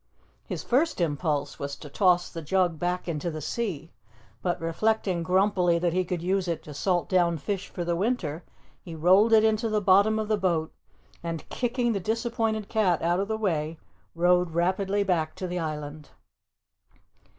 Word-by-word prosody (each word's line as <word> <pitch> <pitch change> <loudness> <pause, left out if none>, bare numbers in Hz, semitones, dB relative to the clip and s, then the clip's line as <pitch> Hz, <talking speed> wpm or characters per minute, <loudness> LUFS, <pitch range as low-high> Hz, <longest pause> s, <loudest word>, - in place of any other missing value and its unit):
His - - -4
first 285 +3 +1
impulse 145 -3 -1
was 140 0 -4
to 150 - -11
toss 175 +3 +2
the 165 - -6
jug 175 0 +1
back 180 +2 -2
into 165 0 -2
the 155 -1 -5
sea, 165 -2 -4 0.5
but 175 -1 -1
reflecting 185 +2 0
grumpily 180 0 +2
that 170 0 0
he 185 +1 +2
could 175 -1 -4
use 190 0 0
it 170 -2 -2
to 150 - -9
salt 175 +4 0
down 175 -3 +2
fish 195 +4 -3
for 175 - -5
the 170 0 0
winter, 180 -6 -1 0.4
he 165 - -9
rolled 185 +8 +4
it 220 -1 +6
into 220 +1 +2
the 215 -1 +1
bottom 205 +2 +4
of 215 -1 -2
the 215 0 +1
boat 170 -4 0 0.5
and, 165 -1 -5
kicking 245 -1 0
the 200 - -1
disappointed 220 +1 -1
cat 190 -8 +1
out 175 +2 +2
of 200 - -1
the 220 0 -1
way, 165 -6 -1 0.4
rowed 175 -1 +2
rapidly 190 +3 +1
back 170 -5 0
to 185 - -5
the 180 0 -3
island. 150 -2 -5
180 Hz, 175 wpm, -27 LUFS, 165-205 Hz, 0.5 s, it